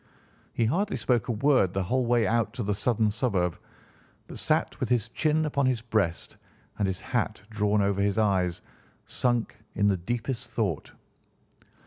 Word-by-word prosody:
He 115 - 0
hardly 195 - 0
spoke 120 -3 +1
a - - 0
word 115 -5 +2
the 95 - +1
whole 125 +6 0
way 120 -2 +3
out 115 -1 +1
to 120 - -2
the 105 +1 0
southern 110 +1 +1
suburb, 100 -6 0 0.7
but - - -9
sat - - 0
with - - -2
his 115 -2 +1
chin 155 +4 +1
upon 140 -3 +1
his 125 -4 0
breast 105 -8 -1 0.4
and 100 - +2
his 95 -1 -2
hat 115 -4 -1
drawn 105 -1 +2
over 100 0 +1
his 100 0 +1
eyes, 95 -5 +1 0.4
sunk 120 -2 0 0.2
in 100 0 +2
the 95 - +2
deepest 120 +6 -3
thought. - - -2
110 Hz, 165 wpm, -27 LUFS, 100-125 Hz, 0.7 s, way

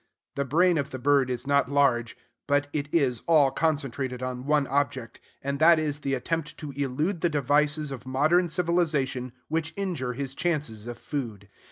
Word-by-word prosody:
The 140 - -2
brain 170 +4 +3
of 140 0 -2
the 130 - -6
bird 140 0 +3
is 125 0 -3
not 140 -1 +2
large; 130 -5 +2 0.3
but 145 0 +2
it 145 -1 -3
is 130 -8 +1
all 150 -5 +5
concentrated 135 -4 -1
on 130 +1 -4
one 150 -1 +3
object, 135 -3 -2 0.2
and 140 0 -2
that 165 +1 +7
is 150 -2 -1
the 135 -2 -1
attempt 150 +4 -3
to 150 -2 -7
elude 145 +6 -2
the 175 - +3
devices 150 +1 +1
of 130 -2 -8
modern 155 +7 +2
civilization 155 -7 0 0.2
which 160 +1 -2
injure 165 -11 -2
his 135 +1 -4
chances 140 -10 -2
of 120 -1 -6
food. 115 -9 -5
140 Hz, 175 wpm, -26 LUFS, 130-155 Hz, 0.3 s, that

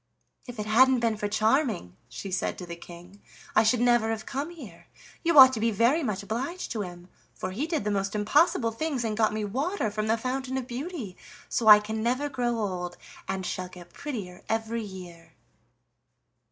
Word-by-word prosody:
"If 245 -1 -8
it 210 - -3
hadn't 255 +4 +5
been 230 -2 +1
for 210 -1 -2
Charming," 215 - +1
she 190 +10 -7
said 185 - -1
to 180 - -7
the 170 -1 -7
King, 175 +3 -13 0.3
"I - - +7
should 225 +2 +2
never 240 -2 +3
have 220 -1 -3
come 280 +4 -3
here; 260 - -12 0.4
you 335 -2 +2
ought 260 -1 +11
to 225 - -2
be 230 +1 +2
very 235 +9 +3
much 210 -7 -2
obliged 260 - -4
to 220 - -2
him, 175 -2 -8 0.3
for 185 - -4
he 260 +12 -2
did 325 - -1
the 210 - -1
most 195 +1 -1
impossible 230 +2 +3
things 270 +1 -2
and 220 -2 -1
got 220 -1 +2
me 215 0 -2
water 265 - -1
from 215 +1 -2
the 225 +1 +2
Fountain 260 +2 -3
of 260 - -3
Beauty, 255 - -6 0.3
so 230 - -1
I 210 -1 +11
can 220 +1 -4
never 255 +5 0
grow 245 -3 -1
old, 180 -4 -3 0.3
and 190 -1 -3
shall 185 0 -4
get 175 -1 -13
prettier 205 -11 -6
every 225 +1 -1
year." 180 -5 -10
220 Hz, 195 wpm, -27 LUFS, 200-255 Hz, 0.4 s, ought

